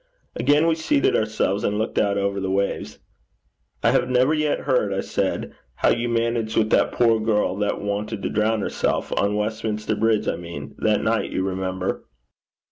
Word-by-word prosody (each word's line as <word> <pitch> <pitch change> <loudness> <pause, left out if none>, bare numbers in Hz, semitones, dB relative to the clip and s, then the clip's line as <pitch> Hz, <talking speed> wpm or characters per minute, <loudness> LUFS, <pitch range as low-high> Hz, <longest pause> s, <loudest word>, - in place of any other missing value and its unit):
Again 145 +2 +3
we 165 - +3
seated 220 - +1
ourselves 110 -2 0
and 105 - 0
looked 110 - -1
out 100 -1 +1
over 100 0 -1
the 95 -1 -2
waves. 100 +1 -1 0.9
'I - - +4
have 125 - +1
never 130 +4 +3
yet 155 -1 0
heard,' 125 -7 +1
I 95 0 -1
said, - - -2 0.2
'how - - +2
you 120 +1 +1
managed 115 -1 0
with 110 -1 +2
that - - +3
poor 115 -2 +3
girl 105 -4 +1
that 105 0 -1
wanted 105 +1 -3
to - - -1
drown 110 +1 +1
herself - - -1
on 100 +1 +1
Westminster 110 0 -2
Bridge, 110 0 +1
I - - 0
mean 85 -5 -8
that - - +1
night, - - 0
you 95 - -2
remember.' 95 0 -2
105 Hz, 180 wpm, -23 LUFS, 100-115 Hz, 0.9 s, I